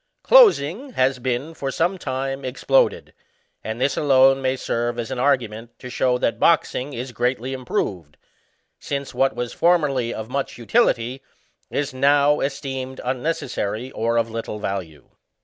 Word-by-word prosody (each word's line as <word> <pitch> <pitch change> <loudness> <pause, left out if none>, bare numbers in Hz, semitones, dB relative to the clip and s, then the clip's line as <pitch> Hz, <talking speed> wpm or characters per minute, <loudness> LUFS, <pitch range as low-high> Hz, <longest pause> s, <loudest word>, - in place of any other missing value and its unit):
Closing 270 - +5
has 130 -4 +1
been 130 +5 -2
for 140 -4 -4
some 175 +7 0
time 135 0 -3
exploded; 470 - +1 0.5
and 110 +1 -5
this 135 +2 +1
alone 135 -2 +4
may 130 0 0
serve 120 -1 -2
as 120 +1 -4
an 130 - -3
argument 120 -4 -1
to 125 - -9
show 125 0 +1
that 115 -2 -1
boxing 145 -4 +2
is 125 +1 -5
greatly 125 +2 -1
improved, 95 - -3 0.6
since 140 -1 -4
what 135 0 +1
was 120 -1 -4
formerly 145 -9 +2
of 110 - -5
much 135 +2 -3
utility 125 - +1 0.5
is 140 -2 -2
now 145 +2 +3
esteemed 135 -1 -4
unnecessary 130 -4 -3
or 115 +1 -1
of 115 -1 0
little 115 -1 -5
value. 90 -9 -5
130 Hz, 145 wpm, -22 LUFS, 120-140 Hz, 0.6 s, Closing